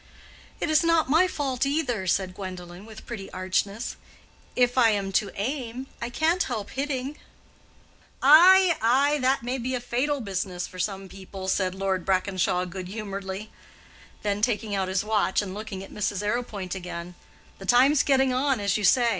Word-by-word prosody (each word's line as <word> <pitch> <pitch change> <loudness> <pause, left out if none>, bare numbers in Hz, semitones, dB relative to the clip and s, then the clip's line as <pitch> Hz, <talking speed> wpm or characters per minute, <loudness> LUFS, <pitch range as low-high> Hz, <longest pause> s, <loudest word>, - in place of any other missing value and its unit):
"It 315 - -1
is 310 +1 +4
not 330 -4 +2
my 335 +5 +5
fault, 270 -7 -2
either," 270 -9 -1
said 185 0 0
Gwendolen, 185 0 -8
with 220 -1 -12
pretty 215 -5 -7
archness. 200 +4 -2 0.6
"If 245 -1 +3
I 245 -3 +5
am 200 -2 -1
to 200 +1 +1
aim, 250 +1 -3 0.2
I 235 - -3
can't 320 +8 +1
help 220 - -3
hitting." 275 +1 -3 1.0
"Ay, 350 +5 +7
ay, 275 +6 +3
that 260 -1 +1
may 250 +2 -2
be 255 +2 -2
a - - -1
fatal 255 +4 -1
business 190 -4 -3
for 185 - -11
some 195 0 -3
people," 190 0 -9
said 185 -1 0
Lord 190 -1 -1
Brackenshaw, 185 -1 +1
good 180 0 -7
humoredly; 200 0 -6 0.7
then 205 -1 -1
taking 215 -2 0
out 190 -1 0
his 190 +1 0
watch 210 -3 +1
and 195 -3 -3
looking 205 -2 -6
at - - -12
Mrs. 205 -1 -2
Arrowpoint 210 -4 -2
again—"The 180 +1 -9
time's 255 +5 +5
getting 265 -2 +3
on, 265 -1 +1
as 200 -1 +1
you 210 - -4
say. 240 +4 +4
215 Hz, 165 wpm, -26 LUFS, 190-260 Hz, 1.0 s, Ay